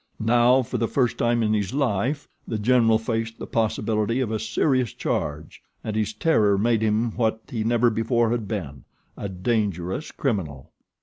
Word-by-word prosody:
Now, 120 +3 +4
for - - -4
the 115 - +1
first 125 -1 0
time 120 0 +2
in 110 0 +1
his 105 +2 -1
life, 135 +2 0 0.2
The 110 - -2
General 115 0 +4
faced 115 0 -3
the - - -6
possibility 110 +1 0
of 125 -4 -1
a 110 - -1
serious 130 -3 0
charge; 75 +1 -3 0.2
and 110 - -4
his 110 -1 0
terror 110 - +2
made 115 +2 +2
him 110 +2 +1
what 110 -2 0
he 115 -3 -2
never 120 +1 +3
before 115 +1 +1
had 115 -3 -2
been, 75 - -5 0.3
a 100 - -5
dangerous 95 - -2
criminal. 90 - -3
110 Hz, 170 wpm, -24 LUFS, 105-120 Hz, 0.3 s, Now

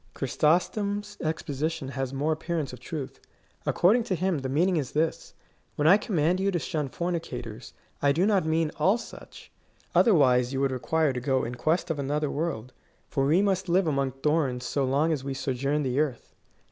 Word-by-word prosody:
Chrysostom's 200 - 0
exposition 155 -2 -2
has 135 -1 -3
more 145 +3 -1
appearance 155 -3 -2
of 125 - -9
truth. 140 +1 -6 0.5
According 210 +8 +4
to 185 - -1
him, 180 -2 0
the 130 -1 -4
mean 160 +8 +2
ing 180 - +1
is 135 -4 -3
this: 160 +2 -1 0.2
" - - -40
When 150 - +1
I 190 +5 +8
command 180 -5 0
you 195 +1 +1
to 185 - 0
shun 155 -4 -2
fornicators, 125 -10 -5 0.3
I 140 - +4
do 170 +7 +2
not 200 -3 +3
mean 160 0 +1
all 195 +5 +4
such; - - -12 0.4
otherwise 130 - +4
you 135 - -1
would 135 -1 +1
require 150 +3 0
to 125 - -3
go 130 0 +1
in 120 - -4
quest 160 +8 0
of 150 - -3
another 145 +1 -1
world; 140 -6 -3 0.4
for 135 -2 0
we 170 +7 +4
must 190 -2 0
live 185 +2 +3
among 140 -4 0
thorns 140 -5 +1
so 135 +2 0
long 145 +5 +2
as 140 -4 -3
we 135 0 -4
sojourn 140 +2 -1
on 130 0 -1
earth. 140 -6 -2
150 Hz, 190 wpm, -27 LUFS, 135-170 Hz, 0.5 s, I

